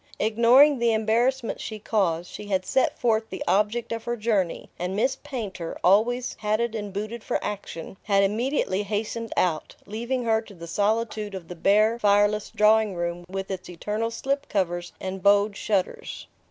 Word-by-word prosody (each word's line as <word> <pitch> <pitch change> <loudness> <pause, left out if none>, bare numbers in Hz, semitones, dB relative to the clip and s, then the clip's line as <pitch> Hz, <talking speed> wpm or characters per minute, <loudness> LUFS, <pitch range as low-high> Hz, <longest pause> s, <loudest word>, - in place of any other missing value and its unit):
Ignoring 240 +6 +5
the 235 -1 +3
embarrassment 230 +3 +1
she 215 - -5
caused, 180 -6 0
she 210 - -9
had 190 -2 0
set 265 - +1
forth 220 -2 +1
the 190 - -5
object 210 +6 +1
of 230 0 -4
her 240 0 -2
journey, 210 -6 0
and 180 +2 -2
Miss 255 +6 +1
Painter, 215 - -6
always 235 +7 +3
hatted 215 +2 0
and 205 -2 -4
booted 215 +4 -5
for - - 0
action, 195 -3 -6
had 200 -1 +2
immediately 215 -1 0
hastened 215 +2 -3
out, 160 -4 0
leaving 235 +4 -3
her 225 -1 +2
to 215 -3 -14
the 170 -1 -9
solitude 210 +2 -1
of 175 -3 -8
the 180 - -6
bare 215 +6 +3
fireless 205 0 +3
drawing 215 -2 +3
room 175 0 -3
with 195 +1 -4
its 185 -1 -6
eternal 210 +6 -2
slip 275 +4 -2
covers 175 -3 -1
and 190 0 -5
"bowed" 200 +1 +4
shutters. 195 -3 -2
210 Hz, 165 wpm, -25 LUFS, 195-230 Hz, -, Ignoring